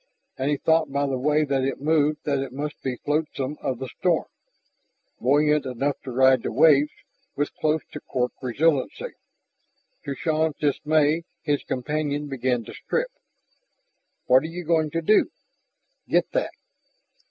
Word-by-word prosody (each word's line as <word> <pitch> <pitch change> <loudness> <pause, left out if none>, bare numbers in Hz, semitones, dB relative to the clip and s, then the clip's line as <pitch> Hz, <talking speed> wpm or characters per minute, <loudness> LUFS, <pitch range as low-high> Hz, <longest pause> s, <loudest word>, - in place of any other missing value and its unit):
And 135 +2 -1
he 145 - +1
thought 160 -1 +2
by 140 +1 +1
the 135 -2 -1
way 150 +3 +2
that 135 -2 0
it 135 0 -2
moved 150 0 +1
that 140 -2 0
it 135 -1 -4
must 150 +3 -5
be 130 -2 -2
flotsam 150 -1 -2
of 130 - -2
the 130 - -5
storm, - - +2 0.9
buoyant 150 +2 +3
enough 135 +3 -2
to 130 - -7
ride 130 0 +5
the - - -3
waves 145 +3 +5 0.5
with 145 +1 -1
close 155 0 0
to 150 - -6
cork 125 -3 -2
resiliency. 140 +2 0 0.9
To 140 - -3
Shann's 155 +2 0
dismay 150 +2 +2 0.2
his 145 -3 0
companion 145 +2 -2
began 125 -3 -1
to - - -10
strip. - - -2 1.1
"What 130 +1 +6
are 160 - -4
you 175 +2 -6
going 160 -1 +2
to 165 +2 -2
do?" 215 +6 +4 0.8
"Get - - +2
that." - - -1
145 Hz, 155 wpm, -24 LUFS, 135-155 Hz, 1.1 s, What